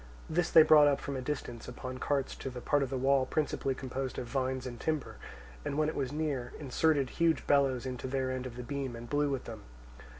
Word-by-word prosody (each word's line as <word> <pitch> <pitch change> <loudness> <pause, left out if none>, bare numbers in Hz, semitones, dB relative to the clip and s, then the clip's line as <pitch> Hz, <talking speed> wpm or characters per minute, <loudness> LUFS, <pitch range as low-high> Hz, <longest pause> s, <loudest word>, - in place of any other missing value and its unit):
This 175 +1 0
they 160 - +9
brought 150 -1 +7
up 140 -1 +2
from 140 - -4
a 130 - -3
distance 125 -4 -4
upon 130 +1 -6
carts 140 -1 0
to 135 - -5
the 125 -1 -7
part 145 +3 +1
of 135 - -1
the 135 - -2
wall 135 0 +3
principally 135 -3 -1
composed 130 0 -4
of - - -3
vines 130 +1 -2
and 120 -2 -6
timber, 155 -3 -2 0.5
and 140 - -3
when 155 0 +2
it - - -5
was 135 -2 -2
near, 145 -5 -2
inserted 145 -1 +1
huge 165 -1 +1
bellows 135 -3 +3
into 130 0 -4
their 130 0 -1
end 130 0 -3
of 120 - -9
the 125 - -6
beam 135 -1 -4
and 120 0 -9
blew 145 0 +2
with 135 -2 -2
them. - - -8
135 Hz, 230 wpm, -31 LUFS, 130-145 Hz, 0.5 s, they